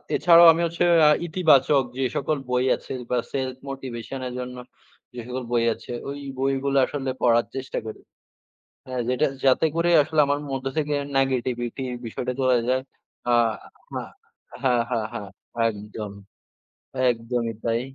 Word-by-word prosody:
এছাড়াও 170 -1 +7
আমি 165 - -1
হচ্ছে 170 +1 -1 0.2
এ - - +7 0.2
ইতিবাচক 150 -5 +4
যে 135 - 0
সকল 150 +2 0
বই 125 0 +1
আছে - - -12 0.2
বা 125 - +1
Self 130 -2 -2
motivation 135 -1 -6
এর 125 - -6
জন্য 125 0 -6 0.6
যে 125 - -7
সকল 125 +1 -4
বই 120 -1 +2
আছে, - - -11 0.2
ওই 140 +1 -5 0.2
বইগুলো 135 +1 0
আসলে 135 -1 -4
পড়ার 120 -1 +4
চেষ্টা 130 0 -4
করি। 110 - -8 0.9
হ্যাঁ, 130 -1 -3
যেটা 125 +4 +2 0.2
যাতে 135 +4 +4
করে, 170 +1 +2
আসলে 155 +1 +1
আমার 145 +1 +1
মধ্যে 135 0 -4
থেকে 150 -1 0 0.2
নেগেটিভিটি 130 -2 -1 0.2
বিষয়টা 125 +3 -3
চলে 130 -1 +4
যায়। 130 +1 +2 0.5
আহা 115 -2 -1 0.6
হ্যাঁ, 130 -2 +3 0.2
হ্যাঁ, 120 -2 +1
হ্যাঁ। 120 -3 -5 0.5
একদম, 105 0 -7 1.0
একদমই 115 0 -2
তাই। 115 0 +1
130 Hz, 145 wpm, -24 LUFS, 120-140 Hz, 1.0 s, এছাড়াও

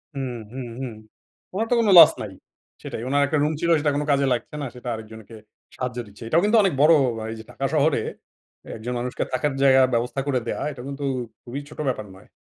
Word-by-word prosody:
হুম, 135 -2 -3 0.2
হুম, 130 -1 -5 0.2
হুম। 125 -4 -4 0.6
ওনার 220 +4 -1
তো - - +5
কোনো 215 -3 +3
লস - - +10
নাই, 105 - -6 0.5
সেটাই। - - -6
ওনার 145 +2 +2
একটা 150 +2 0
রুম 155 +1 +1
ছিল 170 - +1
সেটা 145 0 +1
কোন 145 - 0
কাজে 140 0 +3
লাগছে 125 +5 -5
না, - - -2
সেটা 125 0 -10
আরেকজনকে 110 0 -10 0.4
সাহায্য 125 -1 -4
দিচ্ছে। 105 +3 -13
এটাও 165 +7 +3
কিন্তু 225 +2 +4
অনেক 190 - +2
বড় 160 +2 +7 0.3
আ - - -5
এই - - -5
যে - - -9
ঢাকা - - -4
শহরে, - - +3 0.8
একজন 120 +3 -5
মানুষকে 125 +1 -2
থাকার 135 +2 0
জায়গায় 130 -1 +6
ব্যবস্থা 120 +3 0
করে 130 -3 +1
দেওয়া, - - -2
এটা 130 -3 -9
কিন্তু 140 0 -6 0.4
খুবই 130 +3 -6
ছোট 150 - -13
ব্যাপার 110 -5 -2
নয়। 95 - -17
130 Hz, 215 wpm, -23 LUFS, 120-150 Hz, 0.8 s, লস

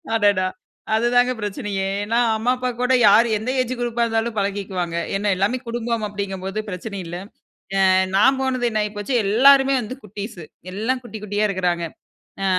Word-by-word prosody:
அடடா! 205 -4 +3 0.5
அதுதாங்க 245 +2 +3
பிரச்சனையே. 205 -2 -3 0.2
ஏன்னா, 230 +3 +1 0.2
அம்மா 230 +3 +1
அப்பா 250 0 -2
கூட 250 +1 +2
யார் 225 +4 +6
எந்த 220 +4 -4
ஏஜ் 255 0 -2
குரூப்பா 240 -1 0
இருந்தாலும் 225 0 -1
பழகிக்குவாங்க. 195 -4 -2 0.2
ஏன்ன 205 +1 +1
எல்லாமே 200 +7 +1
குடும்பம் 230 -1 -2
அப்படிங்கும்போது 195 -1 -4
பிரச்சனை 200 +2 -6
இல்ல. 165 +1 -6 0.7
அ, - - +5 0.3
நான் 265 +7 +5
போனது 255 -2 0
என்ன 215 -1 0
ஆகி 210 - -3
போச்சு, 205 +6 -3
எல்லாருமே 270 +6 +5
வந்து 235 +3 -6
குட்டீஸ் 210 0 -7 0.3
எல்லாம் 230 +7 -1
குட்டி, 225 -2 -8
குட்டியா 205 +1 0
இருக்கறாங்க. 180 -3 0 0.6
அ, - - +1
215 Hz, 155 wpm, -21 LUFS, 200-240 Hz, 0.7 s, யார்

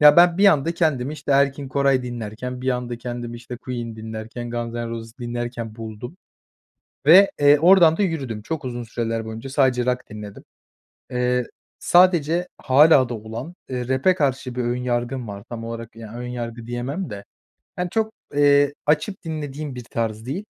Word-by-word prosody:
Ya, 150 0 +8
ben 175 0 +6
bir 200 - +6
anda 165 -2 +4
kendimi 150 -5 0
işte 150 - -2
Erkin 140 0 +2
Koray 135 -1 +2
dinlerken, 120 +1 -5
bir 130 - -2
anda 125 -1 -3
kendimi 120 -1 -5
işte 120 +1 -8
Queen 120 -3 -6
dinlerken, 110 +2 -6
Guns 120 0 -4
And 120 -1 -3
Roses 115 -1 -6
dinlerken 120 -2 -4
buldum. 115 - -8 0.9
Ve, 185 +6 +8
eee, 145 0 +6
oradan 170 -2 +6
da - - 0
yürüdüm. 135 - -2
Çok 145 +4 -4
uzun 120 -1 -4
süreler 115 -1 -3
boyunca 110 +4 -7
sadece 130 -3 +2
rock 125 0 0
dinledim. 105 -1 -9 0.7
Eee, 125 0 +1 0.3
sadece 175 -1 +4
hâlâ 135 -1 +5
da - - -3
olan, 115 +8 -7 0.2
eee, 125 -2 -3
rap'e 130 +8 +3
karşı 130 -5 -1
bir 125 - -1
ön 120 +1 0
yargım 120 0 -2
var. 100 0 -7
Tam 115 -1 -6
olarak, 115 -1 -7
ya, 115 -1 -10
ön 125 0 -5
yargı 120 -1 -6
diyemem 130 +8 -3
de 100 -1 -7 0.5
hani, 180 -1 -2
çok, 220 0 0 0.2
eee, 145 0 +4
açıp 155 +6 0
dinlediğim 150 -3 -5
bir 125 -1 -7
tarz 110 -1 -3
değil 165 +11 -4
125 Hz, 170 wpm, -22 LUFS, 115-145 Hz, 0.9 s, Ya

